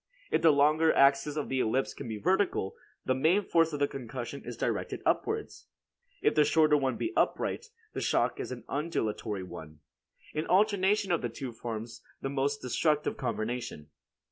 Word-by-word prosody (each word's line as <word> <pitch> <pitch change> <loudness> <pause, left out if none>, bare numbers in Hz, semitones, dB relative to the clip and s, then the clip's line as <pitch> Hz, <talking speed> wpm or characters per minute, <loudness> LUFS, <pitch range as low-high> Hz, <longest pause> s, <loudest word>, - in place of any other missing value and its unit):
If - - +2
the 165 - +6
longer 155 +3 +4
axis 140 +1 +4
of 150 - -2
the 130 - -1
ellipse 130 +3 0
be 115 -6 -6
vertical, 185 - +1 0.3
the 130 - +2
main 160 +10 +3
force 165 -3 +3
of 145 - -3
the 145 - +3
concussion 130 +1 -6
is - - -7
directed - - -2
upwards; 440 0 -1 0.6
if - - +4
the 150 - +5
shorter 155 0 +4
one 135 -3 0
be 335 - -2
upright, 460 - 0 0.3
the - - -3
shock - - +1
is - - -4
an - - -6
undulatory 110 - -2
one. 75 -4 -10 0.5
An 155 +1 -2
alternation 200 0 +3
of 170 - +2
the 120 - -2
two 125 +2 -6
forms 115 0 -6 0.2
the 135 - -3
most 140 +1 -1
destructive 150 +4 +1
combination. 120 - -4
140 Hz, 170 wpm, -30 LUFS, 120-160 Hz, 0.6 s, the